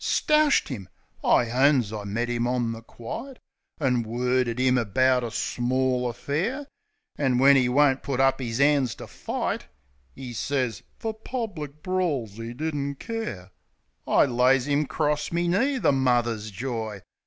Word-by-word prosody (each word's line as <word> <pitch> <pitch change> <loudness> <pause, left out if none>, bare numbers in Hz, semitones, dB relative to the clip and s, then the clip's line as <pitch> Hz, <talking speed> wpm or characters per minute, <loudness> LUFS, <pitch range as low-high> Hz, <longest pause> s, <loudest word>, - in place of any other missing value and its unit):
.Stoushed 300 - +3
'im! 100 -7 -6 0.3
I 120 -2 +3
owns 130 -4 +3
I 105 -1 -5
met 115 +4 -2
'im 120 0 -1
on 120 -2 0
the 115 0 -7
quite, 120 - -8 0.4
An' 125 -5 +2
worded 125 +1 0
'im 130 -1 +3
about 125 +3 +2
a 120 - -2
small 125 +2 0
affair; 175 - -2 0.5
An' 130 -4 +2
when 140 +2 +7
'e 130 -2 +3
won't 135 0 +3
put 135 -2 -3
up 135 0 +3
'is 115 -1 -3
'ands 140 -4 +3
to - - -9
fight - - -4 0.3
— 65 -1 -37
('E 125 -2 -7
sez, 125 -2 -1 0.2
"Fer 225 -1 -3
public 205 - -6
brawls 150 - -1
'e 115 +1 -5
didn't 140 +1 -3
care") 175 - -5 0.3
— - - -44
T - - +5
lays 130 +1 +3
'im 145 0 +1
'cross 150 +2 -1
me 170 +1 0
knee, 260 +11 +2
the 240 - +3
mother's 120 -5 +1
joy. 110 -2 -4
130 Hz, 160 wpm, -26 LUFS, 120-145 Hz, 0.5 s, when